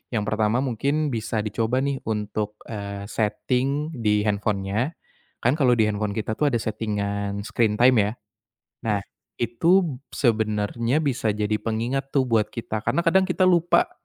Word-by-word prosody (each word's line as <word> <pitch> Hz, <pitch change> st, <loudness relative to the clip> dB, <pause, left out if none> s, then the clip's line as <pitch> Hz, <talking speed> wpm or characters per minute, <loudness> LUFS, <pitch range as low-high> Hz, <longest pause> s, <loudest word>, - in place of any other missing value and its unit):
yang 105 Hz, -, +1 dB
pertama 110 Hz, +3 st, +1 dB
mungkin 140 Hz, +4 st, 0 dB
bisa 110 Hz, -2 st, -2 dB
dicoba 115 Hz, +4 st, 0 dB
nih 140 Hz, -1 st, -1 dB
untuk, 105 Hz, -1 st, -2 dB, 0.2 s
eee, 100 Hz, -2 st, -5 dB
setting 135 Hz, +7 st, 0 dB
di 105 Hz, -2 st, +2 dB
handphone-nya 105 Hz, +5 st, -1 dB, 0.5 s
kan 120 Hz, -, +4 dB
kalau 125 Hz, -3 st, +4 dB
di 115 Hz, -, +3 dB
handphone 105 Hz, -1 st, -2 dB
kita 110 Hz, 0 st, -2 dB
tuh 150 Hz, -, +2 dB
ada 120 Hz, -5 st, +1 dB
setting-an 100 Hz, -2 st, -2 dB
screen 110 Hz, -1 st, +1 dB
time 125 Hz, +2 st, +5 dB
ya. 105 Hz, 0 st, +2 dB, 0.8 s
Nah, 105 Hz, -2 st, +1 dB, 0.4 s
itu 160 Hz, -, +2 dB, 0.2 s
sebenarnya 115 Hz, +2 st, +1 dB
bisa 120 Hz, -7 st, 0 dB
jadi 105 Hz, 0 st, 0 dB
pengingat 120 Hz, +5 st, -2 dB
tuh 135 Hz, -, +4 dB
buat 110 Hz, -3 st, +3 dB
kita 115 Hz, -2 st, -3 dB
karena -, -, +2 dB
kadang 190 Hz, +3 st, +4 dB
kita 185 Hz, 0 st, 0 dB
lupa 175 Hz, -1 st, +4 dB
115 Hz, 150 wpm, -24 LUFS, 105-135 Hz, 0.8 s, time